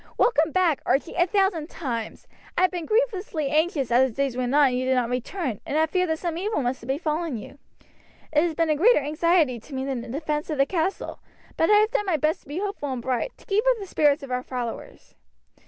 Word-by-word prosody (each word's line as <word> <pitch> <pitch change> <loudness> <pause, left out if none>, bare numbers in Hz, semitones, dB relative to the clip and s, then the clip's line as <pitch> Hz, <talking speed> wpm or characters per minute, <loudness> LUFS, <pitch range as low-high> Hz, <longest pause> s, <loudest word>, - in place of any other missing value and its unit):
"Welcome 320 -10 +3
back, 350 -5 +2
Archie, 290 +5 0
a 350 0 +2
thousand 385 -5 +1
times! 235 -8 -5 0.3
I 365 - +3
have 370 - +4
been 350 -3 -5
grievously 410 - 0
anxious 305 -5 +1
as 260 +2 +4
the 225 - -13
days 275 -3 -1
went 255 +1 -1
on 290 -2 +6
and 250 - -2
you 255 - -1
did 260 0 +2
not 245 -1 0
return, 250 - -3
and 295 - -2
had 315 0 +2
feared 365 -2 +1
that 320 - 0
some 340 0 -3
evil 395 -6 -1
must 245 +1 -2
have 230 - -11
befallen 305 0 -1
you. 245 +6 -11 0.7
It 300 - +5
has 330 -1 0
been 330 -1 +1
a - - +3
greater 430 +11 +5
anxiety 305 -3 +2
to 270 +5 -11
me 265 0 -2
than 265 -3 -2
the - - -9
defence 300 +3 -3
of 305 - -2
the 275 - +4
castle; 355 +4 -2 0.4
but 325 - +2
I - - +6
have 425 +2 +4
done 415 - 0
my 345 -4 +2
best 310 +2 0
to - - -25
be 290 +4 -5
hopeful 390 -8 -3
and 255 - -3
bright, 255 - -2
to - - -20
keep 410 +2 +1
up - - +3
the 405 - -6
spirits 295 -4 +2
of 270 - -8
our 250 0 0
followers." 245 -2 -6
305 Hz, 245 wpm, -25 LUFS, 265-355 Hz, 0.7 s, on